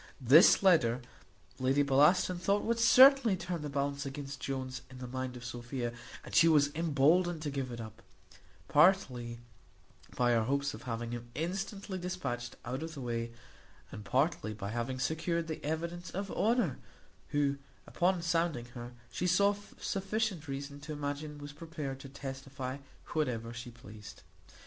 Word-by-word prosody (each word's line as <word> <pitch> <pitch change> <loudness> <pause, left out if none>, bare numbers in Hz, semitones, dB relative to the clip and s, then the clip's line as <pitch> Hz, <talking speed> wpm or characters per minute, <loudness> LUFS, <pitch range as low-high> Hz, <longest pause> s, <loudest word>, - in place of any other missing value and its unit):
This 145 +10 +7
letter 130 -11 +4 0.6
Lady 135 +2 +3
Bellaston 150 +6 +4
thought 200 +3 +1
would 230 0 0
certainly 255 -3 +7
turn 175 -2 -4
the 150 - -4
balance 140 0 -1
against 140 0 -6
Jones 130 -2 -4
in 130 - -11
the 125 - -6
mind 130 0 -4
of 120 - -10
Sophia, 120 0 -4 0.3
and - - -10
she 165 - +6
was 145 -3 +4
emboldened 165 +2 +2
to 145 - -2
give 135 -2 -3
it 120 - -6
up, 110 -2 -9 0.7
partly 140 -8 +3 0.8
by 120 -1 +3
her 115 -2 +3
hopes 140 +3 0
of - - -9
having 115 -1 -4
him 120 0 -6
instantly 190 +3 -3
dispatched 175 -10 -4
out 130 +4 -3
of 160 0 -6
the 140 - -6
way, 115 -1 -3 0.6
and 105 - -8
partly 130 -2 0
by 100 -1 -5
having 120 +3 -2
secured 160 +5 -1
the 160 - -5
evidence 170 +3 -3
of 195 +3 -4
Honour, 220 - +1 0.5
who, 140 -1 +1 0.3
upon 180 0 +1
sounding 165 -6 0
her, 120 0 -8 0.2
she 180 - -1
saw 200 +3 +4 0.3
sufficient 195 -4 -2
reason 140 +1 -5
to 150 +2 -7
imagine 145 +1 -4
was 145 0 -8
prepared 150 -4 -6
to 135 - -10
testify 135 -1 -6 0.3
whatever 120 -7 -1
she 120 +1 -7
pleased. 110 -3 -12
145 Hz, 155 wpm, -32 LUFS, 125-170 Hz, 0.8 s, This